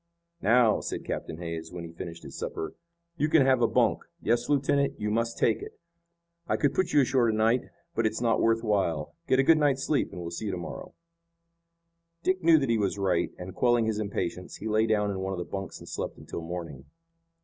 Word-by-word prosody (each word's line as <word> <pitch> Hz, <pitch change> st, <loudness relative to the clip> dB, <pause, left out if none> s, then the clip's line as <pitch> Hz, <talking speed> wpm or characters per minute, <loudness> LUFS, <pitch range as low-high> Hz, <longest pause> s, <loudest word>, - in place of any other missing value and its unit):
"Now," 115 Hz, -1 st, +4 dB
said -, -, -5 dB
Captain 80 Hz, -, -4 dB
Hays, 85 Hz, -1 st, -5 dB
when 90 Hz, -1 st, -6 dB
he 85 Hz, -, -8 dB
finished 85 Hz, 0 st, -8 dB
his -, -, -9 dB
supper, 80 Hz, -, -4 dB, 0.4 s
"you 150 Hz, -, +1 dB
can 150 Hz, -3 st, +5 dB
have 130 Hz, -2 st, +4 dB
a 115 Hz, -, +5 dB
bunk. -, -, +2 dB, 0.2 s
Yes, 120 Hz, +1 st, 0 dB
lieutenant, 140 Hz, 0 st, +2 dB
you 105 Hz, 0 st, -1 dB
must 115 Hz, +1 st, 0 dB
take 115 Hz, -, +2 dB
it. -, -, -9 dB, 0.7 s
I -, -, +2 dB
could 145 Hz, -, +2 dB
put 185 Hz, -2 st, 0 dB
you 145 Hz, -, +5 dB
ashore 125 Hz, -2 st, +3 dB
to 110 Hz, -, 0 dB
night, 115 Hz, +3 st, +3 dB, 0.3 s
but 115 Hz, -, +2 dB
it's 110 Hz, 0 st, -3 dB
not 115 Hz, -1 st, +2 dB
worth 115 Hz, 0 st, +2 dB
while. 95 Hz, -8 st, 0 dB
Get 130 Hz, -, +4 dB
a 135 Hz, -, +5 dB
good 160 Hz, +2 st, +5 dB
night's 140 Hz, -3 st, +2 dB
sleep, 150 Hz, -, +1 dB
and -, -, -7 dB
we'll 85 Hz, -1 st, -5 dB
see 105 Hz, +5 st, -4 dB
to -, -, -2 dB
morrow." 85 Hz, -, -7 dB, 1.3 s
Dick 185 Hz, 0 st, +1 dB
knew 165 Hz, -1 st, +6 dB
that 135 Hz, -5 st, +1 dB
he 115 Hz, -, +2 dB
was 100 Hz, -1 st, 0 dB
right, 95 Hz, -2 st, +1 dB
and, 90 Hz, +1 st, -7 dB
quelling 120 Hz, -2 st, +3 dB
his 110 Hz, -1 st, -1 dB
impatience, 90 Hz, -3 st, -3 dB
he 110 Hz, -, -6 dB
lay 110 Hz, +1 st, +2 dB
down 105 Hz, -2 st, +2 dB
in 95 Hz, -, -4 dB
one 95 Hz, 0 st, -2 dB
of -, -, -4 dB
the 90 Hz, -, -3 dB
bunks 95 Hz, -1 st, -5 dB
and -, -, -12 dB
slept -, -, -4 dB
until -, -, -7 dB
morning. 80 Hz, -5 st, -6 dB
110 Hz, 220 wpm, -28 LUFS, 90-125 Hz, 1.3 s, knew